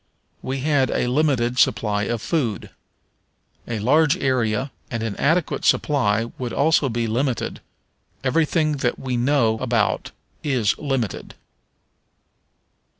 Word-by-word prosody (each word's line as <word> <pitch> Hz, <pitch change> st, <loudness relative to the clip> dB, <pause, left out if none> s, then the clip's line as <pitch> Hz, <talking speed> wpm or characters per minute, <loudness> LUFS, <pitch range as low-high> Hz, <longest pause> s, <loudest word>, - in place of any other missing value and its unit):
"We 130 Hz, 0 st, -3 dB
had 145 Hz, -2 st, +2 dB
a -, -, 0 dB
limited 125 Hz, -3 st, +1 dB
supply 105 Hz, -2 st, +2 dB
of 115 Hz, 0 st, -3 dB
food." 125 Hz, -, -2 dB, 1.0 s
A 120 Hz, -, -3 dB
large 150 Hz, -, +3 dB
area 130 Hz, -, 0 dB, 0.2 s
and 115 Hz, -2 st, -3 dB
an 110 Hz, -3 st, -3 dB
adequate 160 Hz, +3 st, +1 dB
supply 115 Hz, -6 st, +2 dB
would 125 Hz, -2 st, -3 dB
also 150 Hz, -1 st, +2 dB
be 115 Hz, 0 st, -1 dB
limited. 125 Hz, +3 st, -2 dB, 0.6 s
Everything 155 Hz, +2 st, +1 dB
that 120 Hz, -3 st, -1 dB
we 130 Hz, -2 st, -3 dB
know 120 Hz, -3 st, +2 dB
about 115 Hz, -4 st, 0 dB, 0.3 s
is 125 Hz, -8 st, +1 dB
limited. 135 Hz, -7 st, -3 dB
130 Hz, 115 wpm, -22 LUFS, 115-145 Hz, 1.0 s, large